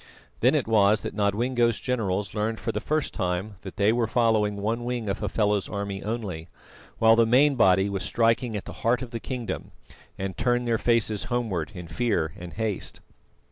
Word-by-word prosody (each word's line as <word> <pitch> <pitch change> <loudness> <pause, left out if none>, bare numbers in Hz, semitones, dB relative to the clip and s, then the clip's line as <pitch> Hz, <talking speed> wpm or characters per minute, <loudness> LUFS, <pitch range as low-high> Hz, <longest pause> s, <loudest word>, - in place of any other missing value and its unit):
Then - - +4
it - - 0
was 105 -1 +4
that - - -5
Nodwengo's 115 +3 +1
generals 105 -6 -1
learned 110 +1 -1
for 115 - -2
the - - -2
first 155 -1 -1
time 95 +2 -2
that 95 - -9
they 105 +2 +3
were 120 -1 +1
following 110 -3 +2
one 110 +4 -2
wing 120 -2 -3
of 100 0 -2
Hafela's 105 -1 0
army 100 -1 -4
only, 100 -7 -4 0.5
while 115 0 +6
the 115 0 +4
main 140 +5 +5
body 95 -5 +4
was 100 -1 -3
striking 115 +1 +1
at 100 - -7
the - - -7
heart 120 +2 +2
of 120 - -8
the 115 - -4
kingdom, 125 -1 -5 0.5
and 95 -1 -4
turned 120 +3 +1
their 115 -1 +1
faces 110 -3 +1
homewards 110 -8 -2
in 90 -2 -7
fear 80 -4 0
and 85 -2 -9
haste. 110 -3 -3
110 Hz, 185 wpm, -26 LUFS, 100-120 Hz, 0.5 s, while